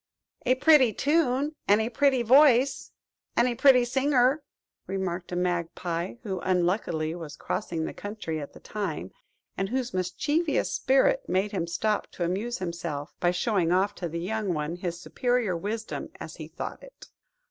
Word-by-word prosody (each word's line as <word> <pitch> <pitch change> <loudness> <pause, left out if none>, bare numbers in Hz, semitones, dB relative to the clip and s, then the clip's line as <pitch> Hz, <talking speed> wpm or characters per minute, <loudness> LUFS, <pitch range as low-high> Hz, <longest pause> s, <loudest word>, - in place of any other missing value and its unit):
"A 255 - +5
pretty 270 -4 +5
tune, 290 - +1
and 205 +2 +5
a 220 +2 -1
pretty 265 0 +3
voice, 265 +1 +5 0.5
and 235 - +5
a 245 - 0
pretty 250 0 +5
singer!" 265 +2 +2 0.5
remarked 185 -2 -3
a - - -2
Magpie, 175 0 -2
who 190 -4 -3
unluckily 175 -3 0
was 160 -4 -7
crossing 165 -6 -3
the - - -5
country 205 -6 -5
at 145 - -8
the - - -13
time, 175 - -4 0.4
and 195 0 -2
whose 255 +1 -2
mischievous 285 - 0
spirit - - +2
made 195 +2 +1
him 180 -5 -2
stop 210 +5 0
to 175 - -3
amuse 200 +8 -1
himself, 170 -5 -5
by 175 - +3
showing 180 -1 +1
off 195 +3 +2
to 175 -4 -5
the 165 - -4
young 200 0 -2
one 150 +2 -2
his 175 -1 -4
superior 245 0 0
wisdom, 215 +6 -4
as - - -8
he - - -7
thought - - -6
it. - - -14
205 Hz, 160 wpm, -27 LUFS, 175-250 Hz, 0.5 s, A